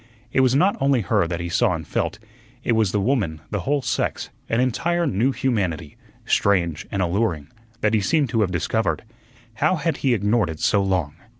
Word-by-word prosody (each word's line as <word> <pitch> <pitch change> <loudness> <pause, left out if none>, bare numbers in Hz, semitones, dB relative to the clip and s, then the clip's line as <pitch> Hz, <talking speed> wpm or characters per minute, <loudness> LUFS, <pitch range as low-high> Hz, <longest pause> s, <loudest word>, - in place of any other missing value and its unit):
It - - +2
was 130 -1 +4
not 185 +8 +3
only 135 -3 +3
her 90 -3 +1
that 85 0 -3
he 85 - -3
saw 85 +1 +2
and 80 -1 -6
felt, - - -2 0.5
it - - 0
was 110 -4 +2
the 105 - +1
woman, 100 - 0
the 105 - -1
whole 140 +9 0
sex, - - -2 0.2
an 115 - +1
entire 170 +8 +1
new 125 - +1
humanity, 100 - -2 0.3
strange 85 -6 +1
and 100 -2 0
alluring, 85 -5 -1 0.3
that 105 +1 +2
he 110 - +3
seemed 145 +5 +1
to 110 0 +1
have 100 - +2
discovered. 90 +6 -1 0.5
How 155 +5 +2
had 160 -2 -1
he 130 -3 +2
ignored 105 -1 +1
it 80 -1 -6
so 100 - +2
long? 90 -6 -1
105 Hz, 195 wpm, -22 LUFS, 90-130 Hz, 0.5 s, was